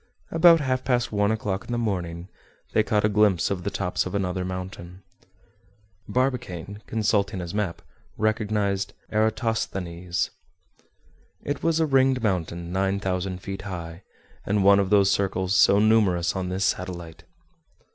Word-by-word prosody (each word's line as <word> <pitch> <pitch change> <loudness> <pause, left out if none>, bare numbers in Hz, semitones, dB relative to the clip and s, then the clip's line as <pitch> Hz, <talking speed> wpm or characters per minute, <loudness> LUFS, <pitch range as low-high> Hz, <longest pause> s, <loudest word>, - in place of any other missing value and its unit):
About 165 0 +6
half 130 -2 -1
past 120 -2 0
one 105 0 +2
o'clock 100 -3 -2
in - - -8
the 120 - 0
morning, 90 -6 -3 0.5
they - - +4
caught 105 -1 +1
a - - +5
glimpse 105 -4 +2
of 90 -3 -2
the 100 - -1
tops 95 -2 -1
of 90 - -5
another 95 -2 -1
mountain. 90 0 -7 1.0
Barbicane, 105 -7 -2
consulting 105 -2 0
his 85 -2 -6
map, 105 -5 -2 0.3
recognized 105 -2 0 0.2
Eratosthenes. 110 -5 -1 1.1
It 145 -1 -3
was 165 -1 +1
a 160 - +3
ringed 130 -3 +3
mountain 85 -4 -2
nine 95 +1 0
thousand 95 -1 -3
feet 95 -1 -5
high, 85 -3 -7 0.4
and 105 0 +1
one 100 0 +6
of 100 -1 0
those 100 -1 +4
circles 95 -1 0
so 100 +1 +6
numerous 100 -6 +3
on 95 -1 -2
this 95 +2 -1
satellite. 85 -3 -3
100 Hz, 145 wpm, -25 LUFS, 90-110 Hz, 1.1 s, About